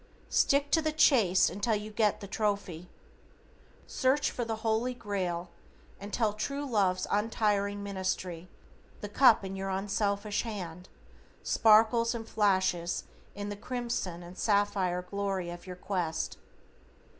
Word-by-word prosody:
Stick 280 +1 +3
to 320 - +4
the 310 0 0
chase 235 - +4
until 205 +4 0
you 210 +1 -5
get 215 -1 +1
the 200 - -7
trophy. 195 -5 -2 1.0
Search 265 +3 +1
for 245 - -3
the 225 -1 -2
Holy 225 +3 +1
Grail 180 -6 -3 0.5
until 210 +2 -1
true 280 +7 -3
love's 200 -8 +1
untiring 205 -1 0
ministry 185 -3 -3 0.5
the 205 - -4
cup 225 -2 +5
in 190 0 -5
your 195 0 -4
unselfish 200 +1 -1
hand 180 -6 -7 0.5
sparkles 225 +2 +4
and 225 -1 -6
flashes 185 -4 +1 0.3
in 205 0 -5
the 205 - -4
crimson 230 -6 -4
and 175 +2 -11
sapphire 200 -4 +1
glory 195 -2 -3
of 175 +1 -10
your 180 - -6
quest. 180 -3 -3
205 Hz, 130 wpm, -30 LUFS, 185-225 Hz, 1.0 s, cup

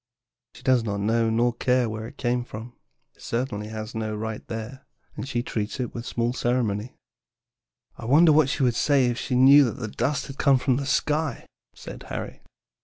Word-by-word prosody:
She - - -14
does 130 -3 +3
not 100 -2 -2
know 115 +2 +1
nor 120 +2 +2
does 120 - -20
she - - -6
care 125 -1 +3
where 110 0 -5
it 140 - -14
came 120 0 0
from; 120 0 -9 0.4
it - - -23
certainly 115 -3 -3
has 110 0 -6
no 110 -1 -3
right 110 0 -5
there, 115 +4 -7 0.3
and 135 - -6
she 120 -3 -1
treats 110 +2 -4
it 125 - -3
with 115 0 -6
small 120 +1 -1
ceremony." 120 -2 -1 1.0
"I - - -7
wonder 155 +7 +6
what 150 -2 +4
she 140 - -1
would 125 -2 +3
say 140 +1 +3
if 120 -1 -1
she 130 - -2
knew 135 +3 +8
that 120 - -3
the 115 - -3
dust 125 +7 -1
had 135 - -10
come 135 -1 +5
from 130 0 +1
the 140 0 -3
sky," 150 -2 0 0.3
said - - -9
Harry. - - -6
120 Hz, 205 wpm, -25 LUFS, 110-130 Hz, 1.0 s, knew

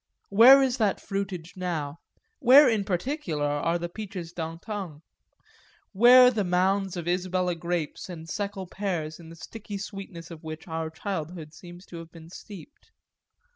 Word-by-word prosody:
Where 250 +7 +8
is 260 -1 0
that 210 -5 +1
fruitage 190 -4 -5
now, 165 -5 -4 0.4
where 275 +2 +8
in 220 -4 +2
particular 180 - -2
are 145 +4 0
the 175 0 -4
peaches 180 -3 -7
d'antan? 165 0 -6 0.9
where 250 +4 +8
the 220 -4 -1
mounds 190 +1 +1
of 170 -1 -5
Isabella 180 0 0
grapes 170 0 -4
and 165 -2 -8
Seckel 200 +2 -4
pears 175 -5 -4
in 165 -1 -12
the 165 - -11
sticky 205 +4 -8
sweetness 195 -4 -8
of 160 -2 -10
which 160 +1 -8
our 160 -1 -3
childhood 160 -2 -5
seems 175 +2 -12
to 170 - -10
have 165 0 -10
been 165 0 -13
steeped? 205 - -12
180 Hz, 150 wpm, -27 LUFS, 165-205 Hz, 0.9 s, Where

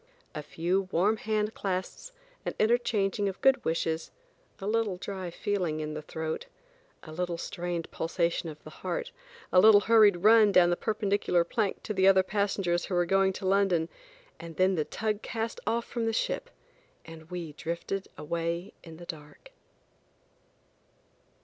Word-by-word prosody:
A 150 - -4
few 180 +5 -1
warm 205 +6 +2
hand 215 0 -1
clasps, 190 - -4 0.3
and - - -4
interchanging 215 -3 +1
of 190 - -8
good 270 0 +4
wishes, 160 0 -1 0.5
a 195 - -6
little 215 -3 0
dry 185 -1 -5
feeling 175 -3 -2
in 155 0 -4
the 155 - -5
throat, 160 - -5 0.6
a 155 - -10
little 175 +1 -3
strained 175 0 -4
pulsation 170 0 -1
of 155 -1 -11
the - - -11
heart, - - -3 0.4
a 180 - +7
little 210 +1 +8
hurried 215 -4 +5
run 215 -1 +7
down 175 -2 +5
the - - +2
perpendicular 205 -4 +1
plank 205 +3 -2
to 215 - -3
the 190 -1 +3
other 190 -1 +6
passengers 195 -3 0
who 185 - -3
were 175 0 +3
going 195 +2 +3
to 190 - -7
London, 185 -4 +2 0.5
and 165 -1 -9
then 185 +1 +3
the 155 -4 0
tug 215 -1 -2
cast 225 0 -4
off 235 +1 0
from 230 -2 -3
the 225 - 0
ship, - - -1 0.6
and 165 -1 -12
we 175 -4 -6
drifted 170 +5 -4
away 170 +3 -3
in 165 -2 -11
the 175 - -10
dark. 160 - -10
190 Hz, 160 wpm, -29 LUFS, 170-210 Hz, 0.6 s, little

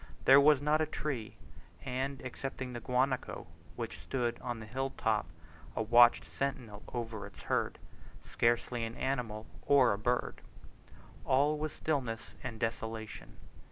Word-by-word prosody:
There 135 +1 +9
was 145 -1 +5
not 150 +1 +3
a 155 - +1
tree, 135 -8 -4 0.5
and, 135 +1 -3
excepting 130 0 -5
the 120 - -4
guanaco, 125 +2 0 0.3
which - - -5
stood 120 -3 -2
on 120 -2 -3
the 110 - -8
hill 135 +5 -2
top 110 -4 +1 0.5
a - - 0
watchful 120 +2 +6
sentinel 125 -7 -3
over 115 -3 -4
its - - -14
herd, - - 0 0.5
scarcely 120 0 +1
an 115 +1 -4
animal 120 -5 -2 0.2
or 135 -6 +6
a 100 - -4
bird. 120 +3 -1 0.8
All 145 +3 +3
was 155 0 -3
stillness 125 -8 -2
and 120 -3 -5
desolation. 115 -1 -4
125 Hz, 140 wpm, -33 LUFS, 115-135 Hz, 0.8 s, There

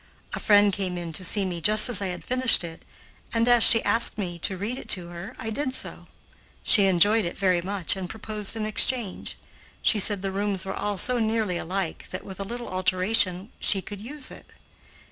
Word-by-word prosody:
A - - -4
friend 205 -1 +3
came 185 -3 -4
in 170 -2 -7
to 185 - -2
see 195 +2 0
me 175 -2 -5
just 215 +6 +7
as 230 -5 +2
I 195 - -2
had 180 -1 -6
finished 255 -5 +4
it, 165 -1 -9 0.5
and, 230 +1 +1
as 240 -1 +4
she 225 0 +8
asked 230 -1 +1
me 175 -4 -5
to 190 +3 -1
read 225 +7 -5
it - - -13
to 175 -1 -10
her, 175 +2 -9
I 220 - -6
did 260 +2 -3
so. - - -8 0.6
She 205 -4 +4
enjoyed 205 +5 +3
it 170 - -5
very 185 -3 +1
much 190 0 -1
and 185 -2 -7
proposed 215 0 -6
an 220 -1 -4
exchange. 215 -1 +1 0.5
She 215 - +2
said 200 -1 +3
the 195 - -3
rooms 195 -1 -3
were 190 - -4
all 205 0 -3
so 250 +5 +1
nearly 220 -5 -1
alike 185 -1 -5
that, 185 - -7
with 190 -1 -10
a - - -3
little 240 +4 -7
alteration, 185 +1 -1
she 195 - +1
could 205 -2 -9
use 275 +4 -8
it. - - -14
200 Hz, 210 wpm, -24 LUFS, 185-220 Hz, 0.6 s, she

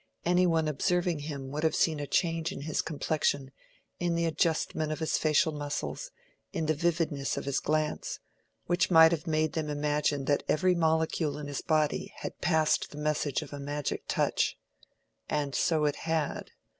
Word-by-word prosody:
Any 180 +1 +4
one 165 -2 +2
observing 175 +3 +1
him 140 -3 -6
would 150 +2 -3
have 160 - +2
seen 160 -3 +2
a 145 - -4
change 165 0 0
in - - -6
his 155 +2 -1
complexion, 145 -3 -1 0.5
in 175 -1 0
the 170 0 +1
adjustment 160 -1 0
of 155 - -2
his 160 - 0
facial 155 +2 +3
muscles, 145 -1 -4 0.4
in 160 - -2
the 155 - +2
vividness 155 -3 0
of - - -4
his 140 -1 0
glance, 155 0 -1 0.5
which 175 +1 +1
might 160 -2 +8
have 165 -2 -2
made 155 0 +1
them 155 -2 -2
imagine 145 -1 0
that 145 0 +2
every 180 +4 +3
molecule 160 -2 +1
in 150 - -6
his 145 -1 -4
body 155 -2 0
had - - -6
passed 160 -2 +2
the 145 - -11
message 150 -2 0
of - - -11
a 145 - -5
magic 145 +1 -3
touch. - - +1 0.7
And 145 -2 -1
so 155 +4 +2
it 145 - 0
had. 160 -2 -2
155 Hz, 175 wpm, -29 LUFS, 145-165 Hz, 0.7 s, might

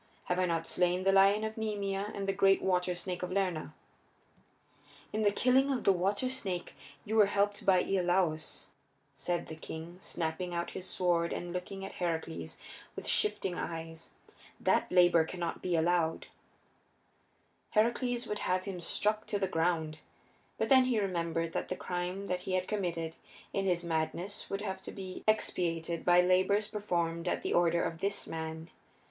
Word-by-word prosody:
Have 180 0 -1
I 185 - +2
not 165 -1 0
slain 180 +1 +1
the 195 - +4
lion 195 +2 +5
of 220 0 -3
Nemea 205 -2 -2
and 195 -1 -3
the 195 - +2
great 195 0 +4
water 180 -1 +1
snake 180 +1 -4
of 180 0 -3
Lerna?" 180 -6 -1 1.4
"In 215 - 0
the 205 - +5
killing 260 +6 +3
of 250 -4 -1
the 195 - +5
water 195 +7 0
snake 195 -9 -3 0.3
you 220 - -2
were 210 -2 +7
helped 205 0 0
by 185 -2 +5
Iolaus," 180 -4 0 0.5
said 175 -1 -2
the 160 - -7
king, 160 +2 -8
snapping 175 0 -3
out 170 0 -2
his 185 - -4
words 170 -2 +2
and 175 0 -5
looking 195 +2 -5
at 195 - -7
Heracles 165 -2 -3 0.4
with - - -6
shifting 195 - +1
eyes. 165 -1 -5 0.5
"That - - +2
labor 175 -2 +6
cannot 170 0 -4
be 180 -2 0
allowed 165 0 +1
you." - - -22 1.4
Heracles 240 +2 +1
would 210 - -3
have 185 0 0 0.2
struck 210 +5 +1
him - - -26
to 205 - 0
the 195 -1 0
ground. 160 -3 0 0.6
But - - 0
then 260 -2 +7
he 245 -4 +2
remembered 170 -4 -1
that - - -2
the 185 - -1
crime 180 +2 -3
that 180 -2 -2
he 185 - -4
had 185 0 0
committed 170 -6 -2 0.4
in 195 - 0
his 175 -2 +1
madness 170 +4 -2
would 195 +1 -2
have 190 -2 -4
to - - -7
be 185 -2 -7
expiated 170 -6 0
by 175 0 +6
labors 185 +3 +3
performed 175 -5 -2
at - - -1
the - - -1
order 170 0 +3
of 165 - -3
this 200 +2 -1
man. 160 +1 -6
180 Hz, 170 wpm, -32 LUFS, 170-200 Hz, 1.4 s, were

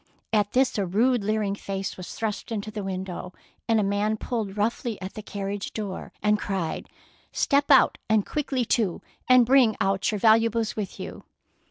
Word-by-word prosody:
At 205 -1 +2
this 255 -3 +2
a 200 - +1
rude 230 +5 +2
leering 210 -1 0
face 195 -1 -4
was 180 -1 -8
thrust 220 0 -3
into 215 -1 -3
the 210 -2 -5
window, 185 -1 -5 0.3
and 225 -2 +3
a - - +2
man 205 +2 0
pulled 215 -4 -3
roughly 225 +1 -1
at 185 +1 -6
the 215 - -7
carriage 200 -1 -5
door 205 -4 -5
and 210 0 +3
cried, 190 -6 -3
— - - -29
" - - -34
Step 280 +1 +2
out, 270 -3 +5
and 215 -2 +3
quickly 270 -4 -1
too, 215 -7 0 0.3
and 255 -1 +7
bring 250 -3 +5
out 195 +2 +1
your 210 - -1
valuables 225 +1 +3
with 210 -3 -5
you." - - -7
210 Hz, 185 wpm, -26 LUFS, 195-230 Hz, 0.3 s, and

